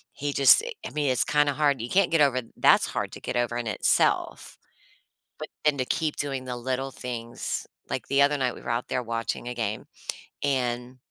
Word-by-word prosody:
he 145 0 -3
just 140 - +7
i 485 - -5 0.2
I - - -6
mean, 150 -2 0
it's 125 - +3
kinda 145 -1 +2
hard, 140 -4 +1
you 120 - -5
can't 195 -1 +3
get 165 -2 +3
over 130 -3 +3 0.2
that's - - +5
hard - - -3
to - - -8
get - - -4
over 120 -1 0
in 120 -1 -3
itself, 105 - +1 0.8
but - - -6 0.2
then 150 -2 +3
to 130 - +1
keep 155 +3 -1
doing 135 -2 -3
the 125 -1 -4
little 130 +2 -2
things, 120 -3 -4 0.2
like, - - -3
the 140 0 +4
other 145 +1 +3
night, 130 -3 0
we - - -11
were - - -9
out 120 +1 -1
there 125 - -1
watching 115 +1 -3
a 125 - -4
game, 110 -3 -3 0.6
and 125 -2 -1
130 Hz, 210 wpm, -26 LUFS, 120-145 Hz, 0.8 s, just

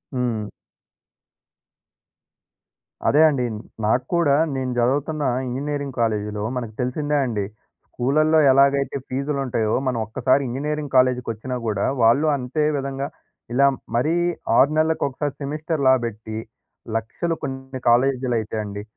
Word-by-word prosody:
హ్మ్. 115 -4 -1 2.6
అదే 150 - +5
అండి. 130 -4 0 0.4
నాకు 125 +4 +2
కూడా 155 -5 +3 0.2
నేను 130 -1 -2
చదువుతున్న 145 +5 0 0.2
ఇంజినీరింగ్ 140 +2 -3
కాలేజిలో 105 -2 -1
మనకు 115 -3 -4
తెలిసిందే 145 +4 -1
అండి. 105 -5 -2 0.4
స్కూల్లలో 155 +5 +2
ఎలాగైతే 140 +1 +3
ఫీజులుంటాయో, 135 -5 -1
మనం 120 -3 0
ఒక్కసారి 130 +4 +2
ఇంజినీరింగ్ 145 +2 -3
కాలేజికొచ్చినా 125 -1 +1
గూడా 105 -3 0 0.2
వాళ్లు 120 +7 +4
అంతే 130 +4 -2
విధంగా 135 0 -3 0.5
ఇలా 140 +3 +4 0.3
మరీ 150 +8 +2 0.4
6 145 - +5
నెలలకొకసారి, 150 -3 0
సెమిస్టర్స్ 150 0 -1 0.2
బట్టి 110 -1 -6 0.6
లక్షలు. 165 +10 -3
కొన్ని 130 0 -5
కాలేజీలైతే 125 -3 +1
అండి, 100 0 -6
130 Hz, 105 wpm, -22 LUFS, 120-145 Hz, 2.6 s, అదే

